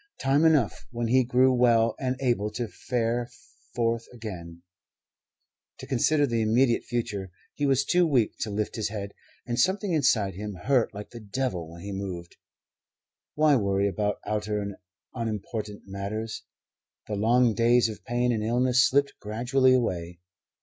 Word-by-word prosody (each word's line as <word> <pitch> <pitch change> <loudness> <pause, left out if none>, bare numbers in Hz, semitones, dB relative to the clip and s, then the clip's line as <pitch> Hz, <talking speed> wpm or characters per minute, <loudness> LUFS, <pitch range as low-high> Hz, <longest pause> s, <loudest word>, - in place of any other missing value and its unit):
Time 140 +4 +3
enough 150 -9 +2
when 120 -2 -3
he 130 +2 +4
grew 130 +1 +3
well 115 -2 +4
and 130 -1 -1
able 120 -5 +1
to 115 +2 -4
fare 120 +5 -2 0.5
forth 115 -1 0
again, 90 -8 -8 1.1
to - - -9
consider 145 +3 +2
the 115 -4 0
immediate 115 +3 +2
future. 105 -6 -3 0.2
He 145 - -1
was 135 0 +2
too 175 +2 +3
weak 125 -8 +2
to 110 - -2
lift 105 +2 -3
his 110 - -1
head, 100 -2 -6 0.3
and 120 -1 -2
something 190 0 +1
inside 115 -10 +2
him 105 +2 -6
hurt 125 +7 +1
like 105 0 -9
the 120 - -9
devil 105 -6 -3
when 85 +1 -11
he 100 - -5
moved. 95 -3 -6 1.0
Why 150 -1 +4
worry 100 -2 +1
about 105 +1 -1
outer 105 0 -1
and 100 -1 -5 0.4
unimportant 110 -2 -4
matters? 100 +3 -5 0.6
The 105 - -5
long 115 +3 +3
days 120 +1 +4
of 110 -2 -8
pain 120 +1 0
and 110 -2 -1
illness 125 +3 +3
slipped 140 +1 +2
gradually 125 +5 +2
away. 90 -8 -2
115 Hz, 155 wpm, -27 LUFS, 105-125 Hz, 1.1 s, he